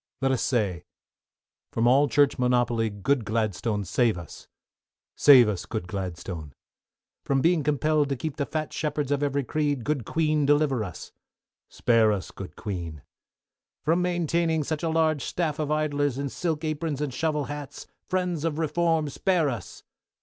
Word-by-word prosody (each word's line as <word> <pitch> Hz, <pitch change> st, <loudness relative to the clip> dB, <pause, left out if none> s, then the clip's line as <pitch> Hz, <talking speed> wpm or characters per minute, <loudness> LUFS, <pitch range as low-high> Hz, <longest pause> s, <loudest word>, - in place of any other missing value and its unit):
LET 135 Hz, 0 st, +1 dB
US 130 Hz, -, 0 dB
SAY. 100 Hz, -9 st, 0 dB, 0.9 s
From 115 Hz, -, 0 dB
all 135 Hz, +4 st, +5 dB
Church 145 Hz, 0 st, +3 dB
monopoly, 120 Hz, -2 st, +2 dB
good 115 Hz, +6 st, 0 dB
Gladstone, 105 Hz, -1 st, -1 dB
save 115 Hz, +2 st, +1 dB
us. 85 Hz, -, -10 dB, 0.7 s
Save 130 Hz, -5 st, +8 dB
us, 100 Hz, -4 st, -3 dB
good 110 Hz, -5 st, -4 dB
Gladstone. 90 Hz, -5 st, -6 dB, 0.7 s
From 135 Hz, -1 st, +1 dB
being 165 Hz, +3 st, +3 dB
compelled 150 Hz, 0 st, +1 dB
to 140 Hz, -, 0 dB
keep 155 Hz, +4 st, -5 dB
the 140 Hz, -, -1 dB
fat 155 Hz, -1 st, -3 dB
shepherds 150 Hz, -2 st, -2 dB
of 145 Hz, 0 st, +1 dB
every 140 Hz, -1 st, 0 dB
creed. 145 Hz, -1 st, -1 dB
Good 145 Hz, -3 st, -1 dB
Queen 155 Hz, +2 st, +1 dB
deliver 145 Hz, -4 st, +2 dB
us. 90 Hz, -5 st, -8 dB, 0.6 s
Spare 115 Hz, -2 st, +3 dB
us, 100 Hz, -3 st, -3 dB
good 95 Hz, -, -9 dB
Queen. 85 Hz, -8 st, -6 dB, 0.8 s
From 165 Hz, +3 st, +3 dB
maintaining 170 Hz, -2 st, +1 dB
such 155 Hz, +1 st, -3 dB
a 165 Hz, -, -1 dB
large 160 Hz, -3 st, +1 dB
staff 155 Hz, -4 st, -2 dB
of 150 Hz, -2 st, -1 dB
idlers 145 Hz, -3 st, 0 dB
in 140 Hz, 0 st, -2 dB
silk 160 Hz, +1 st, -2 dB
aprons 155 Hz, -2 st, -2 dB
and 145 Hz, -3 st, -2 dB
shovel 155 Hz, 0 st, 0 dB
hats, 145 Hz, -1 st, -7 dB, 0.2 s
Friends 180 Hz, -4 st, -1 dB
of 160 Hz, -2 st, -1 dB
Reform, 165 Hz, 0 st, +1 dB
spare 165 Hz, +1 st, +1 dB
us. 115 Hz, -9 st, -7 dB
145 Hz, 155 wpm, -26 LUFS, 115-155 Hz, 0.9 s, Save